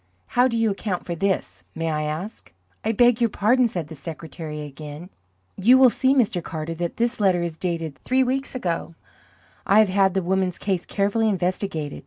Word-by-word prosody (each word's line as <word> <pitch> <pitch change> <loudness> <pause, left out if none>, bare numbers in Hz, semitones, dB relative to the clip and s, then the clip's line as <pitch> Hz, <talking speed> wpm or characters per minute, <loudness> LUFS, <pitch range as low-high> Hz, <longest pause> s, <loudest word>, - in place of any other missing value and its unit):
How 245 +1 +4
do 230 -2 -1
you 225 -2 +2
account 195 -2 -3
for 175 - -3
this, 165 - -2
may 165 0 -1
I 150 0 -1
ask?" 155 - -5 0.3
"I 220 - +1
beg 240 +1 +4
your 235 - +4
pardon," 240 +5 +3
said 175 -8 -4
the 160 - -9
secretary 155 0 -7
again. 150 +4 -9 0.5
"You 240 +7 +6
will 260 -2 +7
see, 265 +3 +2
Mr. 215 -9 +1
Carter, 160 +1 -5
that 170 +1 -4
that 235 +1 0
letter 185 -4 +3
is 165 -2 -4
dated 165 -5 -3
three 260 +1 +2
weeks 270 +1 -2
ago. 170 -7 -3 0.7
I 200 - +5
have 215 -2 +6
had 190 0 +2
the 190 - +1
woman's 185 0 0
case 190 -4 -1
carefully 205 +3 +1
investigated. 180 -5 -2
190 Hz, 190 wpm, -23 LUFS, 165-225 Hz, 0.7 s, will